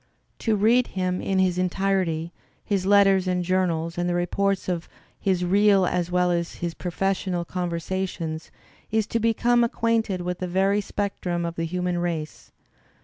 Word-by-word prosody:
To 220 -2 +1
read 230 +5 +3
him 185 -1 0
in 195 - -1
his 185 -1 +2
entirety, 185 -3 0 0.3
his 195 -3 0
letters 195 -2 +5
and 180 -1 0
journals 170 -2 0
and 175 0 0
the 175 - 0
reports 195 +2 0
of 175 -2 -3 0.3
his 185 -2 +1
real 200 +1 +4
as 175 -1 -1
well 180 0 +2
as 170 -1 -1
his 170 -1 -4
professional 185 0 -2
"conversations," 170 -2 -3 0.4
is 220 -1 +1
to 230 - -1
be 230 +1 +2
become 240 +2 +3
ac 235 - 0
quainted 225 -5 0
with 180 0 -4
a 185 - -1
very 190 +3 +2
great 210 - -2
specimen 180 -4 -2
of 170 - -3
the 165 -1 -3
human 180 +1 -1
race. 165 -3 -4
185 Hz, 170 wpm, -25 LUFS, 175-195 Hz, 0.4 s, letters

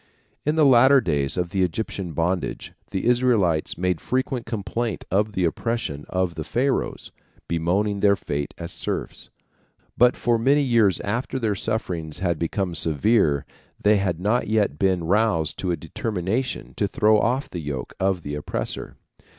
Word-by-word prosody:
In 150 - +2
the 155 -2 +5
later 130 +1 +7
days 75 - 0
of 90 -1 -1
the 95 -2 0
Egyptian 90 -1 -2
bondage 85 +3 -2 0.2
the 95 - -3
Israelites 120 -10 +2
made 90 -1 0
frequent 130 -1 -2
complaint 115 0 -3
of 105 +3 +1
the 95 -3 +1
oppression 85 -6 -2
of 95 -2 0
the 80 - -5
Pharaohs, 130 - -1 0.4
bemoaning 95 +5 0
their 100 0 +4
fate 70 -6 -4
as - - -6
serfs, - - -5 0.7
but 125 +1 +4
for 120 -1 +1
many 140 +5 +3
years 115 -8 +3
after 120 +6 -2
their 110 -5 0
sufferings 90 -7 -3
had 85 -3 -1
become 90 +2 -1
severe 80 - +2 0.3
they 105 0 +4
had 90 -4 -1
not 105 +6 +1
yet 105 -9 +1
been 95 -3 +2
roused 95 -3 +1
to 95 - -2
a 85 - 0
determination 105 - -3
to 100 - +1
throw 105 +1 +3
off 125 +5 0
the 85 - -4
yoke 70 -4 -5
of 95 -3 0
the 75 - -5
oppressor. 75 0 -4
100 Hz, 160 wpm, -24 LUFS, 85-115 Hz, 0.7 s, later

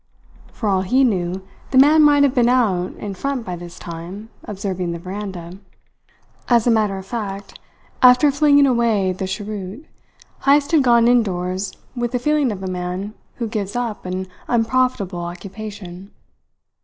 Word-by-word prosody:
For 220 - -4
all 190 -2 +2
he 250 +9 +2
knew, 190 -5 0 0.3
the 260 - +1
man 300 +4 +7
might 290 -1 +6
have 275 -3 +3
been 245 -2 +3
out 200 -8 +1
in 205 -1 -6
front 265 +4 -3
by 180 - -4
this 175 0 -10
time, 175 +6 -8 0.2
observing 190 -4 -3
the - - -4
veranda. 185 -1 -7 0.9
As 235 -2 +3
a 240 - +4
matter 210 -3 +1
of 190 - -8
fact, 200 -3 -6 0.4
after 250 +3 +6
flinging 285 0 +5
away 230 -7 +2
the 190 +1 -4
cheroot, 205 +5 -6 0.5
Heyst 285 +2 +3
had 320 -3 +5
gone 235 -2 +4
indoors 190 -5 0 0.2
with 240 0 -2
the - - +2
feeling 290 0 +1
of 195 -2 -6
a - - -3
man 180 +3 -4 0.2
who 235 - -3
gives 210 -2 -4
up 235 -6 -3
an 185 +1 -3 0.2
unprofitable 235 -5 0
occupation. 190 +1 -8
210 Hz, 155 wpm, -20 LUFS, 185-245 Hz, 0.9 s, man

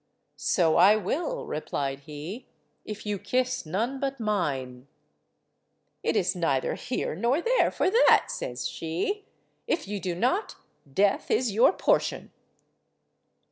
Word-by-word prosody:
"So 165 -4 +2
I 195 +5 +7
will," 325 - -2
replied 140 -2 -3
he, 155 - -7 0.4
"if 215 0 -7
you 205 -2 -2
kiss 255 -4 -1
none 230 +11 -1
but 275 -1 -2
mine." 135 - -2 1.1
"It - - 0
is 185 +1 +1
neither 140 -7 0
here 250 - -3
nor 235 - +1
there - - +3
for - - 0
that," 465 +4 +5
says 125 +1 -4
she. 185 - -3 0.4
"If 330 - -1
you 205 0 -3
do 180 -2 -3
not, 255 - 0 0.4
death 200 +8 +2
is 245 -3 +2
your 225 - +5
portion." - - 0
205 Hz, 130 wpm, -27 LUFS, 160-255 Hz, 1.1 s, I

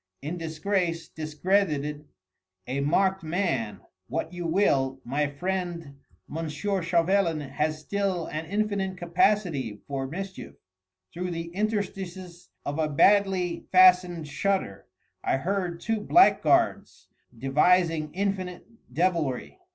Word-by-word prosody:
"In 155 +5 -3
disgrace, 165 +1 -2
discredited, 155 -2 -1 0.6
a 130 +2 -2
marked 190 +7 +2
man 155 - -2 0.3
what 160 +5 -3
you 175 -1 -4
will 135 -7 +2
my 145 +4 0
friend 170 -2 -4 0.4
M. 165 -1 -3
Chauvelin 175 -1 +1
has 150 +3 -2
still 195 -1 -1
an 155 +1 -5
infinite 200 -1 -1
capacity 175 - +1
for 135 -1 -3
mischief. 190 +6 -7 0.6
Through 180 +1 -3
the 165 -1 -4
interstices 190 -4 -4 0.2
of 145 +2 -3
a 155 -1 +1
badly 190 +2 +3
fastened 180 -3 +5
shutter 185 - -2 0.4
I - - +1
heard 180 +2 -2
two 225 +1 -1
blackguards 355 - +3 0.3
devising 155 +4 +2
infinite 185 -2 -2 0.3
devilry. 165 - -1
170 Hz, 105 wpm, -27 LUFS, 150-190 Hz, 0.6 s, fastened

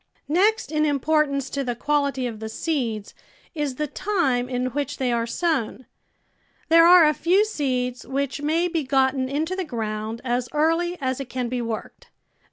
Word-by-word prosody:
Next 405 -2 +2
in 305 -1 +1
importance 290 -1 +1
to 280 - -2
the 245 -2 -2
quality 280 0 0
of 225 -3 -5
the 220 0 -5
seeds 230 -7 -3 0.4
is 295 -5 -2
the 300 - -1
time 275 -8 0
in 250 0 -1
which 290 +1 -3
they 255 -3 0
are 230 -1 0
sov/n. 260 -3 -1 0.8
There 330 +1 +7
are 355 -2 +8
a 305 - +4
few 365 +8 +3
seeds 255 - -2
which 275 +2 -2
may 325 +4 +1
be 330 -3 -1
gotten 265 -1 +1
into 315 +6 -1
the 380 - -2
ground 220 -5 -4
as 245 0 -1
early 330 +3 +1
as 260 -2 -2
it 270 -2 -6
can 250 -2 -3
be 250 0 -2
worked. 230 -2 -6
275 Hz, 175 wpm, -24 LUFS, 250-315 Hz, 0.8 s, are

